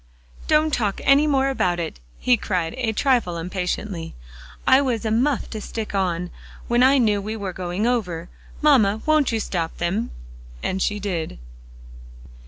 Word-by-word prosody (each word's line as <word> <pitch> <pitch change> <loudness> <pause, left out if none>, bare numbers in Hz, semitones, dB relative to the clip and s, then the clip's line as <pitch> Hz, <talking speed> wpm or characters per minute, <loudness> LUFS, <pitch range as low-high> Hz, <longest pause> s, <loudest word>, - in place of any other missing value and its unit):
"Don't 310 0 +3
talk 210 -5 0
any 280 +2 +5
more 270 -2 +2
about 180 -10 0
it," 165 - -4 0.2
he 250 - +3
cried 180 -7 -2
a 245 -3 -1
trifle 230 -7 +1
impatiently. 180 0 -4 0.5
"I 260 +1 +6
was 240 -5 -1
a 220 - 0
muff 250 +4 +1
to 215 - -5
stick 220 0 -5
on, 180 -3 -1 0.4
when 240 +1 +2
I 265 +2 +6
knew 210 -5 +2
we 215 +2 -4
were 200 -4 -4
going 180 +3 -2
over. 180 -9 -1 0.4
Mamma, 220 -8 +4
won't 310 -4 +3
you 225 - 0
stop 170 -5 -3
them?" 190 +7 -1 0.5
And 190 +1 -1
she 205 +2 0
did. 175 - -3
215 Hz, 160 wpm, -23 LUFS, 180-255 Hz, 0.5 s, I